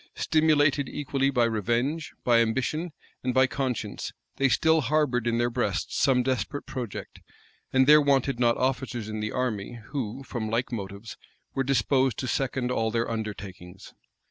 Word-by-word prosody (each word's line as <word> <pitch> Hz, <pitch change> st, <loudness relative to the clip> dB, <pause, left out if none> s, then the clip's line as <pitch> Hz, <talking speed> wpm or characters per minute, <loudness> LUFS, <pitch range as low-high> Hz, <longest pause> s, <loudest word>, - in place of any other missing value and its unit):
Stimulated 145 Hz, -3 st, +2 dB
equally 135 Hz, -1 st, 0 dB
by 125 Hz, -3 st, +2 dB
revenge, 120 Hz, -, 0 dB
by 120 Hz, -1 st, +4 dB
ambition, 130 Hz, +9 st, 0 dB, 0.3 s
and 125 Hz, 0 st, -1 dB
by 130 Hz, 0 st, +6 dB
conscience, 130 Hz, -3 st, -3 dB, 0.3 s
they 135 Hz, 0 st, +3 dB
still 160 Hz, +6 st, +3 dB
harbored 130 Hz, -3 st, +1 dB
in 115 Hz, 0 st, +1 dB
their 120 Hz, +1 st, +1 dB
breast 115 Hz, -5 st, -1 dB
some 125 Hz, -2 st, +3 dB
desperate 130 Hz, +3 st, -2 dB
project; 120 Hz, -6 st, -6 dB, 0.5 s
and 130 Hz, 0 st, +4 dB
there 150 Hz, +2 st, +8 dB
wanted 135 Hz, -3 st, +2 dB
not 120 Hz, -1 st, +3 dB
officers 125 Hz, -3 st, -1 dB
in 110 Hz, 0 st, -4 dB
the 105 Hz, 0 st, -2 dB
army 120 Hz, -2 st, -3 dB
who, 135 Hz, -2 st, -4 dB
from 115 Hz, -4 st, -4 dB
like 115 Hz, +3 st, -1 dB
motives, 100 Hz, -1 st, -6 dB, 0.4 s
were 135 Hz, -, 0 dB
disposed 130 Hz, -1 st, +2 dB
to 130 Hz, -, -3 dB
second 130 Hz, -1 st, -1 dB
all 115 Hz, -3 st, +1 dB
their 115 Hz, +1 st, -1 dB
undertakings. 100 Hz, -4 st, -7 dB
125 Hz, 155 wpm, -27 LUFS, 115-135 Hz, 0.5 s, there